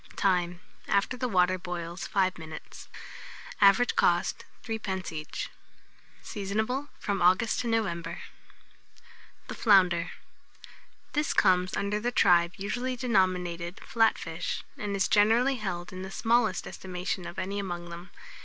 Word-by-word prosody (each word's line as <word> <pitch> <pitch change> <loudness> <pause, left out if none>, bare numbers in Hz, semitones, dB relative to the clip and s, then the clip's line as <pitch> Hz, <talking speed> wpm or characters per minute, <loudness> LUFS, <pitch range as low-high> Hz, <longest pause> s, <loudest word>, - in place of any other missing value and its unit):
Time. 180 -2 +1 0.3
After 200 +5 +1
the 250 0 -2
water 185 -2 +3
boils, 175 -1 -5
5 185 -3 +1
minutes. 160 -1 -10 0.7
Average 200 +5 +5
cost, 175 0 +2 0.2
3d. 210 -5 -3
each. 155 -1 -5 0.7
Seasonable 220 +7 -2
from 200 -2 -2
August 185 +6 +3
to 245 - -2
November. 170 -7 -1
[Illustration: - - -11 0.3
FLOUNDERS.] - - -26
THE - - -3
FLOUNDER. 180 -5 +5 1.0
This 295 0 0
comes 185 -1 +3
under 205 +1 -1
the 240 +3 -1
tribe 175 -5 +4
usually 245 +6 -2
denominated 185 -7 0
Flat 225 -1 +2
fish, 165 0 -4
and 205 -1 -3
is 195 - +2
generally 230 +6 +4
held 180 -5 -4
in 185 - -6
the 190 - -6
smallest 225 -2 +1
estimation 185 0 -4
of 170 - -9
any 200 +2 -2
among 175 -3 -5
them. 175 +2 -9
190 Hz, 135 wpm, -28 LUFS, 175-220 Hz, 1.0 s, Average